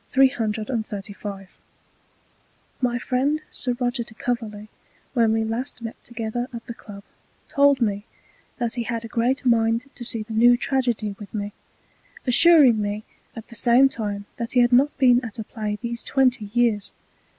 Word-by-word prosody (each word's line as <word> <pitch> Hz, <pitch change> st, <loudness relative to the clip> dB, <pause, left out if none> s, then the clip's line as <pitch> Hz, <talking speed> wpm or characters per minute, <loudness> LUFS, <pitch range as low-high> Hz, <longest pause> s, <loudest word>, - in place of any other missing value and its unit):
335 215 Hz, -6 st, -1 dB, 1.2 s
My 245 Hz, -1 st, +1 dB
friend 260 Hz, +5 st, 0 dB
Sir 250 Hz, -, -2 dB
Roger 245 Hz, -1 st, 0 dB
de 230 Hz, -1 st, -14 dB
Coverley, 215 Hz, -3 st, -4 dB, 0.5 s
when 230 Hz, -3 st, +3 dB
we 225 Hz, 0 st, +1 dB
last 235 Hz, +3 st, -4 dB
met 225 Hz, -, -5 dB
together 235 Hz, +1 st, -4 dB
at 235 Hz, -2 st, -8 dB
the 235 Hz, -, -6 dB
Club, 200 Hz, -3 st, -12 dB, 0.4 s
told 280 Hz, -1 st, +4 dB
me, 205 Hz, -3 st, 0 dB, 0.5 s
that 240 Hz, -3 st, -2 dB
he 240 Hz, -, -2 dB
had 230 Hz, 0 st, -3 dB
a -, -, -5 dB
great 245 Hz, +5 st, 0 dB
mind 230 Hz, 0 st, +2 dB
to 245 Hz, -, -9 dB
see 230 Hz, -2 st, -1 dB
the 220 Hz, +1 st, -9 dB
new 240 Hz, +2 st, +5 dB
Tragedy 240 Hz, -6 st, -1 dB
with 205 Hz, 0 st, -10 dB
me, 205 Hz, -1 st, -4 dB, 0.7 s
assuring 265 Hz, -4 st, +6 dB
me 205 Hz, +1 st, -3 dB, 0.3 s
at 225 Hz, -1 st, -10 dB
the -, -, -11 dB
same 245 Hz, +3 st, +6 dB
time 205 Hz, -4 st, -4 dB
that 230 Hz, -1 st, -4 dB
he 250 Hz, -, +5 dB
had 240 Hz, 0 st, +3 dB
not 275 Hz, +4 st, +4 dB
been 250 Hz, -2 st, +4 dB
at 225 Hz, -4 st, -6 dB
a 220 Hz, -, -4 dB
Play 210 Hz, -1 st, -4 dB
these 235 Hz, 0 st, -3 dB
twenty 255 Hz, -5 st, +2 dB
Years. 230 Hz, -4 st, +1 dB
235 Hz, 160 wpm, -23 LUFS, 215-250 Hz, 1.2 s, assuring